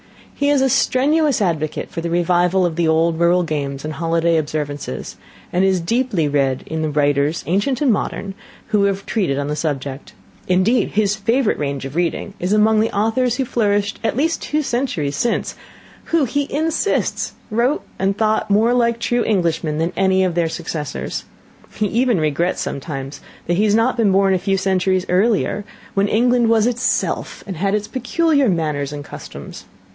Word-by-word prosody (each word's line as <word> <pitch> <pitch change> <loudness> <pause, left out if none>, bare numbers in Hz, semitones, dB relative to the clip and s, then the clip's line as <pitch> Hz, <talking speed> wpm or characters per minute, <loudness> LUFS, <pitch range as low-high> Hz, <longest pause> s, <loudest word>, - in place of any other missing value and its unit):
He 285 0 0
is 285 -2 +3
a 265 - +3
strenuous 290 +3 +2
advocate 155 -4 -2
for 165 - -4
the 170 - -3
revival 175 +2 +2
of 170 -2 -1
the 170 -1 +1
old 160 +1 +2
rural 175 +1 +3
games 140 -3 -3
and 155 - -4
holiday 165 +1 +1
observances, 145 - -4 0.4
and 180 +2 +2
is 190 -1 +3
deeply 200 - 0
read 140 -2 0
in 160 0 -4
the 155 - 0
writers, 145 +1 +1
ancient 205 - 0
and 270 -6 +4
modern, 200 -1 -3 0.4
who 205 -2 +3
have 200 0 -1
treated 180 -12 0
on 145 0 -2
the 150 - -1
subject. 140 -3 -4 0.3
Indeed, 185 +7 +2
his 210 -1 +2
favourite 225 +3 +1
range 140 -2 -3
of 135 +2 -7
reading 175 +3 -1
is 180 +2 -2
among 215 +1 +4
the 220 +1 +2
authors 225 +4 +1
who 265 - -1
flourished 205 -3 0
at 225 - -1
least 325 +4 0
two 305 +1 -1
centuries 235 - -1
since; 235 +7 -1 0.5
who, 330 -4 +2
he 285 +3 -2
insists, 320 +6 0 0.2
wrote 240 +6 +1 0.2
and 195 +1 0
thought 220 -1 +1
more 220 +4 +3
like 235 -1 +2
true 240 +1 0
Englishmen 165 -6 0
than 165 +3 -1
any 190 0 +3
of 185 -2 0
their 170 -1 +1
successors. 160 -3 -5 0.5
He 215 - 0
even 235 0 +1
regrets 155 +4 0
sometimes 135 -1 -5 0.2
that 175 0 0
he 210 - +3
had 210 0 +3
not 235 +3 +2
been 220 -4 +3
born 195 0 +3
a 185 - +1
few 195 +1 0
centuries 190 -1 +1
earlier, 205 +2 +1 0.3
when 200 +1 +2
England 240 +2 +3
was 225 -1 +4
itself, 245 0 -1
and 190 -4 -6
had 195 +4 +1
its 210 0 -2
peculiar 280 +1 +1
manners 150 -5 -1
and 145 -1 -7
customs. - - -10
195 Hz, 180 wpm, -19 LUFS, 160-230 Hz, 0.5 s, and